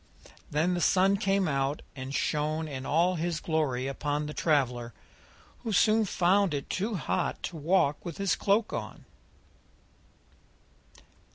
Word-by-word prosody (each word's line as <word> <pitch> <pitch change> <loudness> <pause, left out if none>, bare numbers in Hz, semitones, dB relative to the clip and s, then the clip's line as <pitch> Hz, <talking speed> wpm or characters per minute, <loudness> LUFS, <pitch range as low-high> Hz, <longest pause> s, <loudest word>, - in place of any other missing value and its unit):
Then 160 +5 +1
the 175 - -1
Sun 195 +3 +4
came 195 -2 +1
out 135 0 -1
and 130 0 -6
shone 155 +3 -1
in 135 -3 -6
all 175 +4 +2
his 165 -1 -1
glory 150 -7 -1
upon 145 +2 -2
the 150 - -5
traveller, 125 -8 0 0.6
who 230 - -4
soon 215 +3 +4
found 190 -2 +2
it 140 - -5
too 210 +4 -1
hot 175 - -2
to 170 - -5
walk 150 -2 +1
with 170 -3 -6
his 195 -2 +1
cloak 205 +2 +1
on. - - -6
160 Hz, 135 wpm, -29 LUFS, 145-190 Hz, 0.6 s, Sun